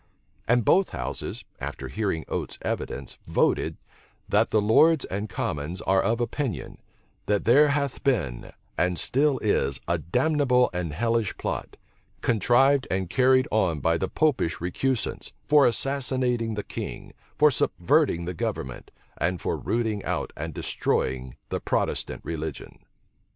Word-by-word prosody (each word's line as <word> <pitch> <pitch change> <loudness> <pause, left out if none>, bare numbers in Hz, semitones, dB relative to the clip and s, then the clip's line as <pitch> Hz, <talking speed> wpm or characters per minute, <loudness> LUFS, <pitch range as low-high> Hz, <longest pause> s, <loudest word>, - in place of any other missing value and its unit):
And 120 -1 +3
both 190 +1 +4
houses, - - -5
after - - -5
hearing 100 -7 -2
Oates's - - -3
evidence, 65 - -4
voted, - - +1 0.5
"That - - +3
the 110 - +3
lords 135 +9 +4
and 100 +3 -4
commons 75 +1 -3
are 95 0 +2
of 115 +1 0
opinion, 120 - -3 0.5
that 105 -1 +1
there 140 +6 +6
hath 145 -2 -1
been, 85 - -1 0.3
and 90 0 +1
still 140 - +2
is, 70 -10 +1
a - - +1
damnable 125 - +2
and 90 -3 -2
hellish 115 +4 0
plot, - - -4 0.4
contrived 130 +5 +3
and 95 -1 -2
carried 130 0 +4
on 90 -8 +1
by 80 +4 +1
the 95 - -1
Popish 150 - +1
recusants, 115 +8 -2
for 145 -2 +6
assassinating 125 -3 0
the 105 - -3
king, - - -7 0.2
for 150 0 +6
subverting 120 - +1
the 90 - -3
government, 65 -6 -4 0.3
and 90 0 0
for - - -1
rooting 110 -3 -1
out - - -3
and - - -6
destroying 65 -1 -1
the - - -2
Protestant - - -1
religion." 80 -3 -5
110 Hz, 135 wpm, -26 LUFS, 90-130 Hz, 0.5 s, there